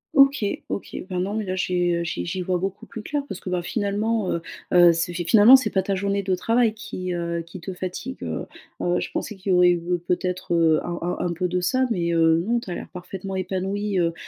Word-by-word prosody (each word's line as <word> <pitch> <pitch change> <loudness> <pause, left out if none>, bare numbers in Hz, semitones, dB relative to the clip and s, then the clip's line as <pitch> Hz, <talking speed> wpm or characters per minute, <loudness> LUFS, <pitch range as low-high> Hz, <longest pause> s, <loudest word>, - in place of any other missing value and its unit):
OK, 275 -5 +5 0.2
OK. - - -5
Bah, 180 - -3
non, 195 +3 -1
mais 220 -1 -1
là, 185 -1 -3
j'ai, 180 -1 +1
heu, 170 - -1
j' 165 - -4
j'y 185 +1 -3
vois 180 0 0
beaucoup 195 +4 -4
plus 220 - -8
clair, 290 +4 -2
parce 195 - -6
que, 185 - -7
bah, 180 -1 0
finalement, 210 0 -1
heu, 170 - -1 0.3
heu, 175 -1 +7
c'est 165 +1 -1
fi 175 0 -2
finalement 220 +7 +8
c'est 255 -6 +2
pas 190 - +2
ta 195 +1 -1
journée 200 +1 0
de 190 -1 0
travail 230 +3 +2
qui, 185 -4 -5
heu, 170 0 -2
qui 170 +3 -10
te 185 +3 -6
fatigue, 185 +9 -6
heu, - - -3 0.4
heu, 175 0 +1
je - - -4
pensais 210 - -4
qu'il 190 0 -3
y - - +5
aurait 180 0 +6
eu 175 -1 0 0.3
peut-être, 180 -1 -1
heu, 160 -2 +4
un 175 0 -4
un 175 +1 -2
un 170 - -1
peu 180 +2 -1
de 180 0 -1
ça, 255 +9 +2
mais 170 -5 0
heu, 165 0 +4
non, 235 +1 +1
tu 200 - -10
as 175 - -3
l'air - - -7
parfaitement 190 +2 -6
épanoui, 190 +2 -1
heu, 165 -1 +1
185 Hz, 250 wpm, -24 LUFS, 175-205 Hz, 0.4 s, finalement